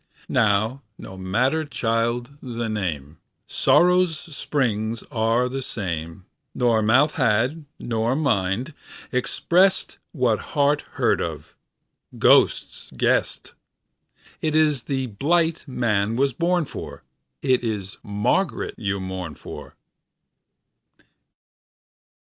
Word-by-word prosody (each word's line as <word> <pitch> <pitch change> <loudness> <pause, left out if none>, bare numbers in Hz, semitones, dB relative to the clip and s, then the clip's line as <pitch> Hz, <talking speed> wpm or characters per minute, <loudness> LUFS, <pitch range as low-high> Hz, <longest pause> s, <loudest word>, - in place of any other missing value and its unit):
Now 110 +3 +2 0.2
no 95 - -10
matter, 125 +12 0
child, 120 -1 -1
the 120 -3 -4
name:Sórrow's 110 - +1 0.2
spríngs 115 -6 -1
áre 115 0 +1
the 135 +1 -3
same. 85 -6 -5 0.3
Nor 120 -3 +2
mouth 130 +8 +3
had, 130 +5 +1
no 115 -2 -3
nor 115 +3 +1
mind, 120 - 0 0.4
expressedWhat 135 - +1 0.2
heart 145 +1 +3
heard - - +1
of, - - -5 0.6
ghost - - +3
guessed:It 155 -1 -3
ís 150 -5 +2
the 135 -2 -1
blight 160 +9 0
man 115 -4 0
was 135 +1 +1
born 170 +4 +1
for, - - -8 0.4
It 130 -3 +2
is 105 -4 -4
Margaret 105 - 0
you 100 -2 -1
mourn 95 -4 -5
for. - - -10
120 Hz, 95 wpm, -23 LUFS, 105-145 Hz, 0.6 s, mouth